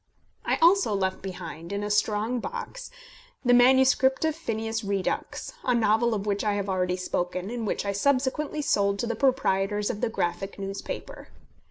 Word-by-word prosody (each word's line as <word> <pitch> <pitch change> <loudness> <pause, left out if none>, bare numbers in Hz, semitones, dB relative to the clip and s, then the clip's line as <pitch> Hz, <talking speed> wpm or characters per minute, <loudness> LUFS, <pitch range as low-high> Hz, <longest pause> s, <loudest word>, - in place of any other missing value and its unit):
I - - +1
also 345 - +5
left 190 -1 -1
behind, 175 -2 -7
in 200 0 -2
a 205 - -2
strong 215 +3 +1
box, 480 - -6 0.6
the 245 - +5
manuscript 265 +3 +5
of 315 -1 0
Phineas 225 -7 -3
Redux, 200 -2 -2
a 250 - +2
novel 225 +1 +2
of 200 -1 -3
which 205 -1 -1
I 210 -1 +1
have 200 -1 -2
already 180 -1 0
spoken, 180 +2 -3
and 235 -3 -3
which - - -2
I 200 - 0
subsequently 280 +6 0
sold 200 -6 +2
to 220 - -2
the 235 - -1
proprietors 210 -6 +1
of 210 - -7
the 240 - +1
Graphic 195 -1 -3
newspaper. 195 0 -6
210 Hz, 170 wpm, -26 LUFS, 195-255 Hz, 0.6 s, also